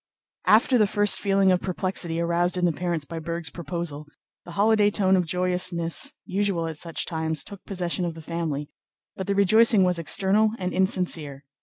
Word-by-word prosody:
After 235 +3 +4
the 210 - +4
first 205 0 +2
feeling 195 -1 +2
of 180 - +1
perplexity 180 -2 -2
aroused 170 +1 0
in 180 - +1
the 175 - +2
parents 170 -2 -3
by 165 +2 -7
Berg's 170 +1 -5
proposal, 160 -2 -5 0.4
the 175 - -10
holiday 210 +2 +3
tone 190 -2 +2
of 180 -2 0
joyousness 180 - +1
usual 195 -3 -1
at 160 -2 -6
such 165 -2 -2
times 160 -2 -2
took 200 -2 -11
possession 180 -2 -2
of 170 -2 -3
the 165 - -10
family, 155 -3 -4 0.4
but 190 - -6
the 200 - 0
rejoicing 210 +1 +5
was 180 -2 +1
external 200 +6 +2
and 180 -3 -4
insincere. 170 -7 -1
180 Hz, 175 wpm, -24 LUFS, 165-195 Hz, 0.4 s, rejoicing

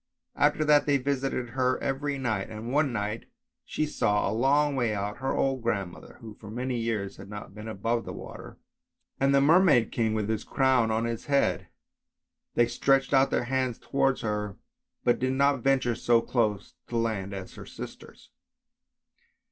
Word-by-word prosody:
After 155 - +2
that 150 -1 +4
they 145 -1 +4
visited 135 -2 -2
her 130 +1 +1
every 140 +1 -2
night, 110 -7 -2
and 110 +3 -6
one 145 -2 +2
night 105 0 -3 0.4
she 155 - -2
saw, 105 -8 +1
a - - -1
long 140 +5 +2
way 120 -5 0
out, 100 +1 -3
her 135 0 -1
old 135 -2 0
grandmother 100 -6 -4
(who 110 -2 -9
for 105 0 -12
many 125 +3 -3
years 110 -4 -2
had 95 +1 -11
not 105 -1 -8
been 105 +2 -9
above 115 +2 -1
the - - -7
water), - - -9 0.6
and 135 +1 +3
the 140 - +5
Merman 150 - +5
King 110 -2 0
with 105 -2 -1
his 110 -1 -2
crown 130 -4 +2
on 110 +1 0
his 115 -1 -4
head; 140 -1 +1 0.9
they 120 - +5
stretched 135 +3 +1
out 135 0 +5
their - - 0
hands 130 -1 -1
towards 135 -1 0
her, 105 -2 -3 0.5
but 120 - +2
did 130 +1 0
not 140 0 +3
venture 130 -2 +2
so 120 0 +3
close 110 -4 -1
to 120 - -3
land 110 -4 -1
as 95 -2 -7
her - - -11
sisters. - - -11
120 Hz, 175 wpm, -27 LUFS, 110-135 Hz, 0.9 s, the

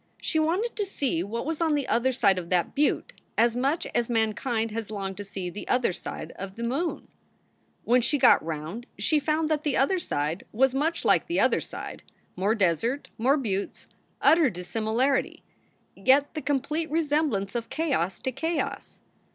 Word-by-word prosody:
She 315 - 0
wanted 360 +10 0
to 420 - +1
see 275 - -1
what 225 +7 -4
was 320 +1 -2
on 320 -2 +3
the 285 -2 -1
other 250 +3 +2
side 200 -7 +3
of 170 -1 -8
that 180 -2 +1
butte 295 +1 +1 0.2
as 235 +1 +4
much 275 +7 0
as 240 0 0
mankind 225 0 0
has 225 -1 -4
longed 195 -3 -4
to 205 - -5
see 195 -2 -5
the 205 - -8
other 250 -7 +2
side - - -7
of 195 0 -6
the 235 - -5
moon. 280 +9 -2 0.8
When 245 +1 +4
she 290 +5 +1
got 265 - +6
round 165 - -5
she 310 - +2
found 310 +2 0
that 305 -1 0
the 295 -3 0
other 365 +8 +2
side 155 - -2
was 260 +3 +3
much 315 +5 -1
like - - +3
the 340 - 0
other - - +3
side - - -7 0.3
more 200 +5 +1
desert, 220 - 0
more 265 +6 +3
buttes, 200 -7 -3 0.3
utter 320 -4 +5
dissimilarity, 225 +8 -1 0.5
yet 275 +2 +3
the 310 - -4
complete 300 +3 -1
resemblance 295 -10 0
of 235 -1 -3
chaos 270 - -1
to 260 - -2
chaos. 320 +6 -3
250 Hz, 175 wpm, -27 LUFS, 205-300 Hz, 0.8 s, got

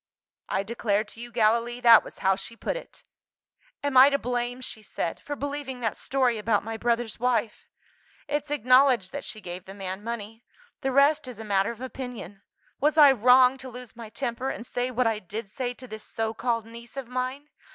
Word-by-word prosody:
I 195 - 0
declare 210 -1 0
to 220 +1 -13
you, 240 0 -8
Gallilee, 235 +1 +2
that 230 -2 +8
was - - -11
how 190 0 +5
she 230 - -7
put - - -3
it! - - -10 0.8
'Am 285 -2 -1
I 260 +2 +9
to 280 - +1
blame,' 245 -1 -2
she 220 -3 -7
said, 170 -5 -4
'for 290 - -5
believing 280 -2 -5
that 225 -3 -1
story 255 -4 0
about 210 -1 +1
my 225 +1 -5
brother's 235 0 -1
wife? 240 -2 0 0.6
It's 295 0 -2
acknowledged 255 -6 +4
that - - -5
she 215 - -6
gave 180 0 -7
the 195 - -10
man 190 0 -5
money 225 0 -6 0.4
the 270 -2 0
rest 280 +2 +4
is 250 -4 -8
a 220 - -7
matter 195 -1 +2
of 235 0 -7
opinion. 250 -6 -7 0.4
Was 300 +3 +2
I 290 -3 +9
wrong 255 +2 +5
to 260 - -8
lose 250 0 -10
my 230 -2 -9
temper, 245 +2 -3
and 235 - -5
say 245 +1 -2
what 250 0 0
I 225 -2 +1
did 210 +1 -7
say 245 +2 -3
to 255 - -11
this 220 -2 -7
so 225 0 -2
called 230 -1 -1
niece 235 +2 -12
of 270 -3 -5
mine? 255 +4 -4
240 Hz, 205 wpm, -26 LUFS, 220-260 Hz, 0.8 s, I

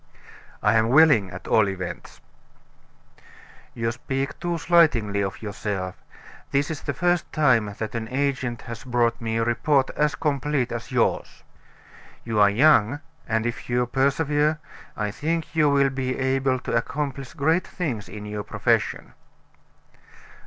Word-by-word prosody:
"I - - +4
am 110 0 +2
willing, 140 -8 +5
at 90 +1 -9
all 110 -3 +3
events." 90 -2 -7 1.5
"You 115 0 -1
speak 135 +3 -4
too 175 0 -2
slightingly 140 - +3
of 95 +2 -4
yourself; 100 -3 -4 0.5
this 140 +3 0
is 155 - -5
the - - -4
first 175 -1 0
time 115 -9 +2
that 110 -1 -4
an 115 -1 -3
agent 130 -2 -2
has 115 -1 -8
brought 120 -2 0
me 115 0 -2
a 115 - +1
report 130 +4 +1
as 150 0 0
complete 145 -3 -1
as 120 +3 -6
yours. 125 -2 -1 0.8
You 110 -2 -1
are 100 -1 +6
young, 130 +2 +4 0.3
and 110 0 0
if 120 +1 -4
you 125 0 +1
persevere, 145 +4 +1 0.4
I 105 -1 -1
think 165 +8 -3
you 155 -2 +4
will 140 -1 +3
be 130 -1 -2
able 130 0 +1
to - - -3
accomplish 135 +2 -3
great 160 +4 +1
things 120 - -4
in 105 +2 -8
your 105 0 -4
profession." - - -1
130 Hz, 145 wpm, -24 LUFS, 110-145 Hz, 1.5 s, are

